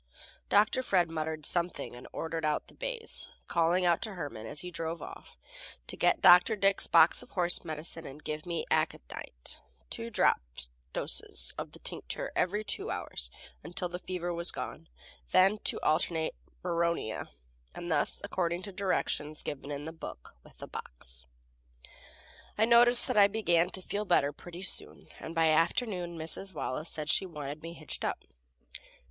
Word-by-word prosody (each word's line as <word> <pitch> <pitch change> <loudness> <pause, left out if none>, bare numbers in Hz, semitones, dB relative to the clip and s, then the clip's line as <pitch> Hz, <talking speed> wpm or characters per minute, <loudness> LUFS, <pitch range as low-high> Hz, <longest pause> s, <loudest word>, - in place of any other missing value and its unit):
Dr. 210 +5 +4
Fred 180 -9 +2
muttered 155 -1 -3
something 175 -7 0
and 120 - -10
ordered 165 0 -3
out 150 -1 0
the - - -17
bays, - - -2 0.2
calling 175 +2 +2
out 170 -1 +3
to 215 -3 -3
Herman, 145 -10 -6
as 145 - 0
he 180 - -6
drove 165 0 -3
off, - - -10 0.5
to - - -6
get - - +2
Dr. 180 +5 +8
Dick's 195 -1 +2
box 165 -1 +6
of - - -13
horse 175 -2 +1
medicine 160 0 -6
and 140 +3 -11
give 155 +2 -4
me 170 -1 -2
aconite - - -2 0.3
two 115 - -5
drop - - +3 0.5
doses - - +1
of - - -6
the - - -12
tincture - - -5
every 205 +4 +1
two 200 - -3
hours 65 - -4 0.3
until 175 +3 -4
the 180 +1 -5
fever 175 -1 -3
was 170 +1 0
gone; - - -6 0.4
then 195 +3 +6
to - - +3
alternate 160 +1 +1 0.3
bryonia, 170 -9 -1 0.5
and 175 0 -5
thus 145 -2 +5
according 180 -3 -1
to 200 - -5
directions 180 -5 0
given 140 0 -5
in 145 0 -4
the 160 - -5
book 115 - -9
with - - -19
the - - -8
box. - - -7 1.3
I 220 - +5
noticed 240 +1 +7
that - - 0
I 200 -1 +8
began 175 -5 +2
to 190 -1 -6
feel 205 +3 -2
better 145 -6 +3
pretty 175 +5 -9
soon, - - -1
and 165 - -7
by 165 -1 +4
afternoon 175 +2 +1
Mrs. 165 +3 -1
Wallace 150 +2 -3
said 155 -1 -5
she 185 +3 +3
wanted 150 -2 -6
me 165 +1 -7
hitched 155 -2 -6
up. - - -2
170 Hz, 165 wpm, -31 LUFS, 155-185 Hz, 1.3 s, Dr